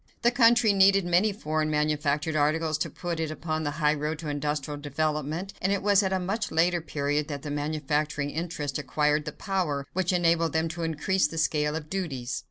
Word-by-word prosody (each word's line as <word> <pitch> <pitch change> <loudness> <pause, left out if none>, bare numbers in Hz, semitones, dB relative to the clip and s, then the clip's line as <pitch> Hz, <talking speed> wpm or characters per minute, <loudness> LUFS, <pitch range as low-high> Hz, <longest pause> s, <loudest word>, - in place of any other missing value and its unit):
The 240 - +5
country 235 -3 +5
needed 195 -1 +5
many 175 +5 +3
foreign 155 -5 -2
manufactured 150 0 0
articles 155 +1 +1
to - - -1
put 175 -3 -4
it 160 -1 -1
upon 155 0 -3
the 150 - -1
highroad 150 0 +1
to 155 -1 -6
industrial 145 0 -2
development, 155 +5 -2
and 190 - +1
it 200 -1 0
was 205 0 +5
at 190 -1 -1
a 190 - +2
much 200 +5 -2
later 175 +2 +2
period 145 -1 -1
that 145 -3 -5
the 150 - -5
manufacturing 150 0 -1
interests 150 -3 -3
acquired 150 +2 +1
the 150 - -4
power 165 -7 -2
which 185 -1 0
enabled 170 -2 +2
them 160 +1 +1
to 170 +1 -6
increase 165 +4 +1
the 165 - -8
scale 150 -1 +1
of 155 -1 -5
duties. 145 -9 -3
155 Hz, 190 wpm, -27 LUFS, 150-175 Hz, -, The